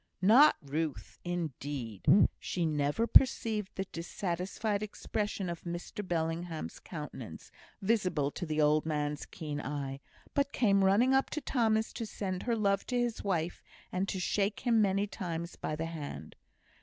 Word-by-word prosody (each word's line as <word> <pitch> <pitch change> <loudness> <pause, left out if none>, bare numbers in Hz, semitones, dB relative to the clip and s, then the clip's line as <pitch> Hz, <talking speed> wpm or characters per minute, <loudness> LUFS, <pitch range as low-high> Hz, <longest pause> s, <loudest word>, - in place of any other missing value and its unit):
Not 245 +10 +8
Ruth, 150 +1 -3
indeed! 145 - -4 0.3
She 175 -2 -1
never 150 +6 +1
perceived 220 -5 +4
the 195 - -2
dissatisfied 185 +4 -2
expression 210 -1 -3
of 170 -1 -4
Mr 175 +4 -5
Bellingham's 165 - -2
countenance, - - -8 0.3
visible 185 -9 +1
to 175 - -5
the 155 0 -1
old 150 0 +4
man's 150 -2 -2
keen 150 -2 -5
eye; 140 -1 -4 0.3
but 280 0 +1
came 200 -5 +4
running 215 +7 +4
up 270 0 +3
to 305 - -2
Thomas 220 -5 +1
to 230 - -4
send 185 -3 -3
her 235 -1 0
love 200 -2 +2
to 250 - 0
his 240 -2 -1
wife, 175 -4 -1 0.3
and 185 +2 -1
to 190 - -2
shake 200 +3 0
him 235 -3 +3
many 200 0 +2
times 170 -4 -5
by 155 - -3
the 160 +1 -3
hand. 145 - -6
180 Hz, 150 wpm, -32 LUFS, 155-210 Hz, 0.3 s, Not